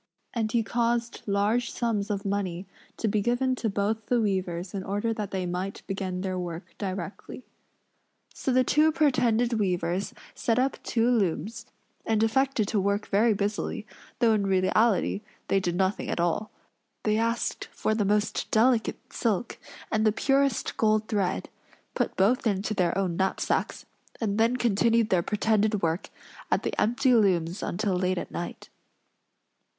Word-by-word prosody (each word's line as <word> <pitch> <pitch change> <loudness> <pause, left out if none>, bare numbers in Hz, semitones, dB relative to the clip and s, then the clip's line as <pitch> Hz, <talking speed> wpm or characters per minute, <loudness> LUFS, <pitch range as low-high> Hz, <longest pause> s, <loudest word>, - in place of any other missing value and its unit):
And 220 -2 -1
he 230 -1 +2
caused 235 0 -1
large 205 +4 +1
sums 225 -4 -1
of 200 0 -2
money 195 -2 -2 0.3
to 225 - -1
be 210 0 +1
given 245 +4 +1
to 225 - -1
both 210 +2 -1
the 245 - +2
weavers 185 -4 -1
in 195 -2 -3
order 205 +4 -1
that 210 -3 -4
they 190 -1 -2
might 180 +3 -4
begin 190 -2 -3
their 185 -1 -2
work 175 0 -6
directly. 195 +5 -5 0.9
So 265 - -2
the 255 0 +4
two 305 +5 +4
pretended 245 -6 +2
weavers 180 -1 -1 0.2
set 230 -1 0
up 265 +2 0
two 230 0 +1
looms, 220 0 0 0.4
and 220 -1 +1
affected 235 -1 +2
to 215 - +1
work 200 +2 0
very 215 +2 +3
busily, 205 +1 -2 0.3
though 230 -2 +4
in 205 -2 +1
reality 195 +2 +2 0.3
they 195 - +3
did 175 -2 -1
nothing 190 +2 0
at - - -2
all. 175 +5 0 0.5
They 215 0 +2
asked 230 +1 -1
for 215 - -2
the 215 -1 +1
most 210 +1 0
delicate 230 +1 +3 0.2
silk 230 0 -1 0.3
and 215 -1 +2
the 215 - +4
purest 275 +2 +1
gold 215 0 +2
thread; 200 -4 0 0.5
put - - -1
both 225 +6 +3
into 205 +1 0
their 180 -3 +1
own 185 -3 0
knapsacks; 190 0 -1 0.3
and 210 -2 -1
then 230 +3 +3
continued 230 -1 +2
their 180 -2 +4
pretended 210 +1 +1
work 165 +3 -1 0.4
at - - +1
the - - -2
empty 250 +3 +3
looms 185 -5 +2
until 200 +2 -1
late 185 0 0
at - - -5
night. 175 - -6
210 Hz, 155 wpm, -27 LUFS, 190-230 Hz, 0.9 s, the